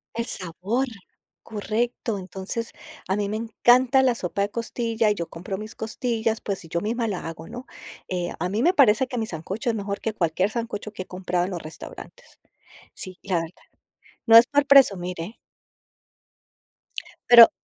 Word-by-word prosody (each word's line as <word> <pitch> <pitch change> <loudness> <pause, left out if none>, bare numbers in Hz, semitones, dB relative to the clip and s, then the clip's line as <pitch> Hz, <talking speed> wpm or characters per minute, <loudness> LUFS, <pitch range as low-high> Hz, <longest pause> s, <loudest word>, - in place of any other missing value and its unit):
El 230 0 -1
sabor, 200 +8 -2 0.6
correcto. 220 +1 -2
Entonces, 190 +5 -4 0.4
a 195 - +1
mí 205 -1 0
me 210 - -3
encanta 245 +4 +4
la 255 -2 +3
sopa 200 -1 -1
de 205 - -1
costilla 230 -1 -1
y - - +3
yo 170 -4 -4
compro 180 +3 -6
mis 215 +2 -8
costillas, 225 0 -1
pues, 195 -3 -4
y 165 - -13
yo 170 - 0
misma 225 +3 -1
la 180 -4 -4
hago, 165 0 -8
¿no? 245 +2 -8 0.4
Eh, 180 -1 -2
a 180 - 0
mí 210 +7 -1
me 360 - +4
parece 260 - +5
que 250 - -5
mi 225 - 0
sancocho 190 +8 -4
es 230 - +1
mejor 200 -1 -3
que 220 - -2
cualquier 180 +2 +1
sancocho 220 -2 -4
que 190 - -6
he - - -26
comprado 180 -1 -2
en 190 - -5
los 175 -3 -4
restaurantes. 155 0 -11 0.5
Sí, 185 -1 -7
la 190 -3 0
verdad. 165 +2 -10 0.6
No 225 -1 +8
es 230 +1 +10
por 290 0 +2
presumir, 195 -11 +5
¿eh? 175 +8 -6 1.9
Pero 235 -1 +11
210 Hz, 175 wpm, -24 LUFS, 185-235 Hz, 1.9 s, Pero